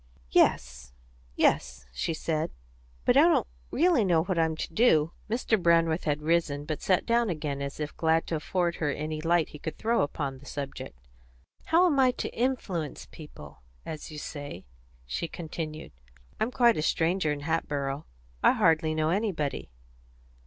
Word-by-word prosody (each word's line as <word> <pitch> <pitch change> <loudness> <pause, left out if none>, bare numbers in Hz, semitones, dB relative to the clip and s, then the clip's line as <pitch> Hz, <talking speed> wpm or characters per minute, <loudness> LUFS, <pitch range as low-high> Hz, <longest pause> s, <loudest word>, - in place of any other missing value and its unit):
"Yes, 60 0 +2 0.4
yes," - - +1
she 110 - -2
said; 155 -1 -1 0.6
"but - - +4
I - - +8
don't - - +4 0.2
really 330 -5 +3
know 170 -4 +3
what 180 -1 -1
I'm 160 -1 +2
to 160 - -5
do." 165 -8 +4 0.2
Mr. 220 -2 +1
Brandreth 165 -1 +3
had 150 -1 -1
risen; 155 -3 +1
but 155 -1 -3
he - - -10
sat 185 -2 +2
down 235 -1 +2
again, 150 -4 -3
as 140 +1 -5
if 150 -1 -4
glad 160 0 +2
to 165 - -2
afford 170 +2 -1
her 150 - 0
any 155 +2 -3
light 170 -1 +2
he 150 - -11
could 160 - -5
throw 230 +1 +1
upon 140 -2 -3
the 145 - -16
subject. 140 - -6 0.7
"How 340 +3 +4
am 295 -6 +2
I 260 -1 +6
to - - -5
'influence 210 - -2
people,' 75 - -12 0.2
as 155 -2 -6
you 155 - -9
say?" 145 - -7 0.4
she 65 - -3
continued. 160 -2 -6 0.5
"I'm 220 - +1
quite 240 -2 +4
a - - 0
stranger 165 +1 +1
in 145 -1 -3
Hatboro'; 145 -2 -2 0.3
I - - +5
hardly 160 -1 +2
know 155 0 +1
anybody." 180 - -1
160 Hz, 165 wpm, -28 LUFS, 145-180 Hz, 0.7 s, I